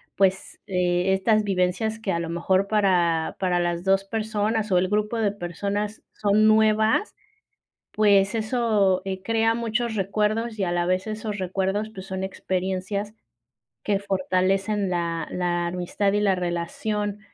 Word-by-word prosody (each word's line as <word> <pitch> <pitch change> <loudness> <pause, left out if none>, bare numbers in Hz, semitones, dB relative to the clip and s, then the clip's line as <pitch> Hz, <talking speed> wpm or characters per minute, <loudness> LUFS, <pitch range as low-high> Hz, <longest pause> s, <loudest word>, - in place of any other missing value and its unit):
pues, 190 -1 0
eh, 180 0 +1
estas 215 +3 +2
vivencias 200 +3 0
que 215 -3 -2
a 170 - 0
lo 165 -1 -4
mejor 185 +3 +1
para 180 -6 +2
para 180 -2 +1
las 175 0 -1
2 195 0 +2
personas 215 +1 -1
o 180 - +4
el 185 +1 +1
grupo 210 +2 0
de 215 -3 +1
personas 205 +3 -4
son 210 +1 +3
nuevas, 220 - +3 0.8
pues 200 -1 +3
eso, 215 -4 +1
eh, 190 -1 -4
crea 225 +1 +2
muchos 235 0 -1
recuerdos 215 +3 -1
y - - +1
a 175 - -1
la 175 0 0
vez 185 +3 0
esos 215 -1 -4
recuerdos 190 +3 -1
pues 190 -2 -8
son 190 -1 -4
experiencias 190 +2 -3 0.7
que 205 -1 +1
fortalecen 195 +1 0
la 170 -2 -2
la 175 -1 -1
amistad 180 +3 -1
y 205 - +1
la 200 -2 +3
relación. 190 +4 -3
195 Hz, 150 wpm, -24 LUFS, 185-215 Hz, 0.8 s, o